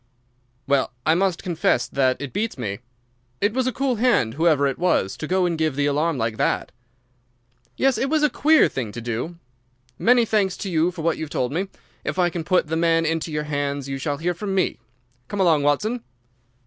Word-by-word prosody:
"Well, 140 -2 +1
I 160 - +4
must 185 0 0
confess 165 -8 +1
that 130 -2 +1
it 140 -2 -6
beats 215 -1 -2
me. 105 -5 -4 0.6
It 205 +1 +1
was 255 0 0
a - - +1
cool 260 -1 -1
hand, 230 - +2
whoever 155 -1 +3
it 135 -2 -1
was, 175 - +1
to 155 - -5
go 185 +1 +2
and 170 -2 -1
give 155 -3 +1
the 145 0 +1
alarm 150 +2 +1
like 115 -2 -2
that." - - 0 1.1
"Yes, 270 -1 +2
it 270 - 0
was 310 0 +2
a 300 - +5
queer 310 +1 +5
thing 120 -6 -4
to 120 - -6
do. 120 +8 -4 0.6
Many 240 0 +4
thanks 200 -4 +1
to 195 - -5
you 165 +1 +2
for 175 -3 -7
what 165 0 +1
you 160 - -3
have - - -13
told 125 -2 -1
me. 180 +6 -1 0.4
If - - -3
I 175 -1 +2
can 170 -1 -4
put 185 +1 +2
the 160 +1 -3
man 165 0 +2
into 160 0 -1
your 150 0 -2
hands 145 -2 -2
you 135 0 -4
shall 145 +1 -2
hear 175 +4 -1
from 195 +2 -4
me. 190 - 0 0.5
Come 205 - -5
along, 165 -6 +4
Watson." 210 +12 0
165 Hz, 210 wpm, -23 LUFS, 140-195 Hz, 1.1 s, a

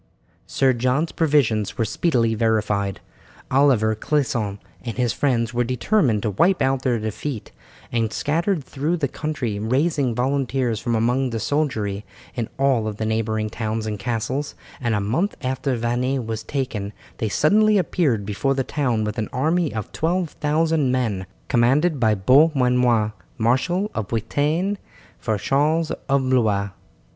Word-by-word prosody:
Sir 135 -1 +2
John's 130 +7 0
previsions 135 - +1
were 115 - +1
speedily 115 0 +1
verified. 105 -3 0 0.5
Oliver 130 -5 +4
Clisson 110 -5 -1 0.3
and 115 -1 -5
his 125 -2 +1
friends 120 -4 0
were 120 0 +1
determined 125 - +1
to 105 - 0
wipe 175 - +3
out 135 0 +1
their 125 -3 +1
defeat, 110 +3 -5 0.4
and 115 -2 0
scattered 165 - 0
through 150 +6 -2
the 145 -4 0
country 130 -8 -3
raising 130 +2 +1
volunteers 130 -2 0
from 120 - -1
among 125 +4 +1
the 115 -1 -3
soldiery 110 -7 -1 0.3
in 115 -3 -3
all 130 -5 +2
the 105 +1 -4
neighbouring 110 -1 -1
towns 110 -1 -3
and 105 -2 -3
castles, 120 +6 -2 0.2
and 120 -4 0
a - - +1
month 130 - 0
after 130 0 -1
Vannes 120 +2 -1
was 110 -1 -3
taken 110 -7 -3 0.3
they 110 - -1
suddenly 210 - +4
appeared 150 - +1
before 120 +7 0
the 135 - 0
town 125 -6 0
with 105 +2 -3
an 110 - -2
army 160 +4 +1
of 110 -3 -5
12,000 160 -3 0
men, 110 -8 -1 0.2
commanded 135 +6 +2
by 110 -3 +3
Beaumanoir, 125 -2 +3 0.2
marshal 165 - +1
of 110 -4 -3
Bretagne 150 - 0 0.4
for 110 -2 -1
Charles 155 +8 +1 0.2
of 135 -1 +2
Blois. 105 -6 +2
125 Hz, 145 wpm, -22 LUFS, 110-145 Hz, 0.5 s, Oliver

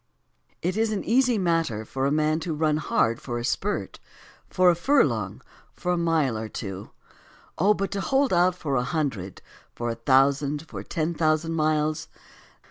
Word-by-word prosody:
It 180 +2 0
is 225 0 +1
an 210 - -2
easy 245 0 +3
matter 165 - 0
for 135 +4 -2
a - - 0
man 155 +1 +1
to 165 -1 -3
run 155 0 +1
hard 115 -6 0
for 120 -2 -4
a 120 - -3
spurt, - - -2 0.5
for 185 -1 +4
a - - 0
furlong, 275 - +1 0.3
for 180 - -3
a - - +2
mile 165 -7 +1
or 110 0 -4
two: 95 -4 -6 0.7
Oh, 205 +5 +4
but 195 0 -3
to 200 - -2
hold 270 +1 +1
out 180 +1 +3
for 150 -6 -3
a 125 - +1
hundred, 125 - -3 0.3
for 120 0 -2
a - - -4
thousand, 140 +4 +2
for 100 -8 -7
ten 160 +10 -2
thousand 155 0 +1
miles 155 -1 0
155 Hz, 175 wpm, -25 LUFS, 135-180 Hz, 0.7 s, for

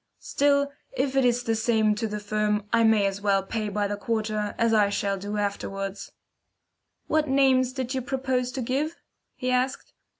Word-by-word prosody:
"Still, 280 0 +1 0.2
if 265 0 -1
it 270 - +4
is 245 0 +2
the 225 - 0
same 220 -1 +2
to 215 +2 -2
the 210 0 -4
firm, 210 0 -1
I 230 0 +4
may 220 -2 +4
as 195 0 -2
well 200 -1 +2
pay 215 +2 -3
by 205 0 -1
the 205 - -2
quarter, 215 -1 -2
as 230 -1 +2
I 210 -2 +4
shall 200 -1 -1
do 205 +2 -4
afterwards." 195 -1 -3 0.9
"What 310 -1 +1
names 265 -2 +3
did 260 -1 -4
you 260 - -1
propose 260 -1 -1
to 260 - -3
give?" 285 +7 -1 0.4
he 255 -1 -2
asked. 255 +1 -1
225 Hz, 180 wpm, -26 LUFS, 210-260 Hz, 0.9 s, it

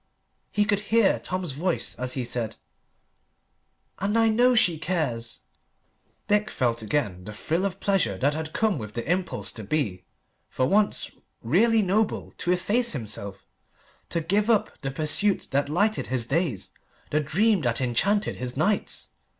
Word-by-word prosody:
He 210 - +2
could 205 -1 +1
hear 225 -3 +4
Tom's 185 -4 -3
voice 165 +6 -1
as 125 0 -3
he 130 - -2
said 120 -2 -3 1.4
"And 205 +3 0
I 225 0 +5
know 245 +3 +4
she 175 -8 +3
cares!" 145 -9 -2 0.9
Dick 210 +1 +2
felt 120 -3 0
again 105 -6 -1
the 105 - -7
thrill 165 - -1
of 195 -1 -3
pleasure 185 - +1
that 140 +8 +1
had 160 0 -4
come 215 -6 +1
with 110 -1 -8
the 120 - -4
impulse 180 +2 -1
to 110 - -7
be, 105 -6 -1 0.5
for 130 - 0
once, 205 +8 +1 0.3
really 215 - +4
noble, 205 +3 0
to 175 - 0
efface 205 +6 +1
himself, 100 -6 -5 0.6
to 170 - -1
give 205 +7 +1
up 220 -3 +2
the 135 - -2
pursuit 155 +8 +2
that 140 +1 +1
lighted 205 +8 +1
his 125 -2 0
days, 135 - -1 0.4
the 150 - +2
dream 190 +7 +2
that 120 -3 0
enchanted 195 - +1
his 125 0 -4
nights. 200 +8 0
160 Hz, 155 wpm, -26 LUFS, 125-205 Hz, 1.4 s, I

